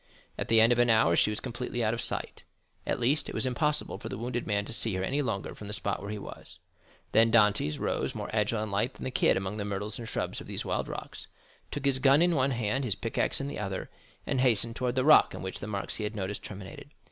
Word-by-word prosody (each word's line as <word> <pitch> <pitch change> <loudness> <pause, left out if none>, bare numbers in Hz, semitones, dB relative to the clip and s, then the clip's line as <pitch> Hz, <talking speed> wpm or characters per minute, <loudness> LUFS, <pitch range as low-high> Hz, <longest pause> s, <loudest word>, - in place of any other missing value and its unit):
At - - -4
the 115 0 +5
end 115 +2 +6
of 120 - -1
an 120 0 +4
hour 110 -7 +5
she 105 - +4
was 105 - -2
completely 120 -1 -3
out 110 0 +2
of 115 - -2
sight; - - -3 0.5
at - - 0
least, 130 +6 +1
it - - -6
was - - +2
impossible 150 +4 0
for - - -6
the - - -5
wounded 120 +1 -3
man 100 -1 0
to - - -6
see 110 -3 0
her 95 - -1
any 140 +9 0
longer 115 -8 -3
from 105 - -9
the 105 - -3
spot 100 - -2
where 100 - -6
he 105 - -3
was. 100 - -8 0.5
Then 115 +1 +5
Dantès 105 -9 +3
rose - - -1
more - - -4
agile 105 0 +1
and 110 - -5
light 105 +6 0
than - - -9
the 130 - -3
kid - - +3
among 95 +2 -3
the 105 - -2
myrtles 105 +2 -4
and 115 - -6
shrubs - - -3
of - - -11
these - - -4
wild - - -1
rocks, - - -7 0.4
took 145 -1 -4
his 135 -1 +3
gun 140 +4 +5
in 175 0 +3
one 135 -3 +2
hand, 120 +1 -1
his 110 -6 0
pickaxe 115 +3 -1
in 140 - -3
the 140 - -5
other, 95 -2 -4 0.3
and 130 -2 0
hastened 115 -2 +3
towards 125 -1 -1
the 130 0 +1
rock 155 - +6
on - - -7
which 95 - -4
the 105 - -6
marks 100 -2 -3
he 110 - -3
had 105 +1 -3
noted 100 0 -3
terminated. 100 +6 -9
115 Hz, 265 wpm, -29 LUFS, 105-125 Hz, 0.5 s, end